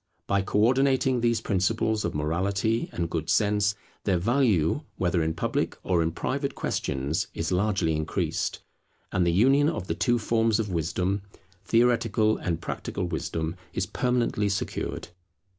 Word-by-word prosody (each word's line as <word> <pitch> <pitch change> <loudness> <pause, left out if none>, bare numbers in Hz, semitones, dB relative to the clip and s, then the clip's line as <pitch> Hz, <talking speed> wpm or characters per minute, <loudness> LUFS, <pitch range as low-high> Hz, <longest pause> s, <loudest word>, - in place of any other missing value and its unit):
By 100 0 +1
co 95 - -2
ordinating 130 +2 +3
these 115 -1 +2
principles 110 +2 0
of 85 - -2
morality 95 +9 0
and 85 -1 -2
good 80 -1 -3
sense, 105 -1 +2 0.3
their 95 -3 +2
value, 110 - +2 0.2
whether 90 -2 +1
in 80 0 -1
public - - -1
or 90 -3 +2
in 80 0 +1
private 140 - -2
questions, 70 +4 -2
is 85 +1 -2
largely 95 -4 +1
increased; 75 0 -2 0.5
and 90 -1 +2
the - - +4
union 135 - +4
of 155 - -3
the 80 - -1
two 120 +8 +2
forms 115 -1 +1
of 105 -2 -1
wisdom, 90 +4 -1 0.4
theoretical 115 -2 +3
and 85 -2 -2
practical 90 - -4
wisdom, 80 -1 -3 0.2
is 90 - -1
permanently 120 -2 0
secured. 100 - -3
100 Hz, 145 wpm, -27 LUFS, 85-115 Hz, 0.5 s, the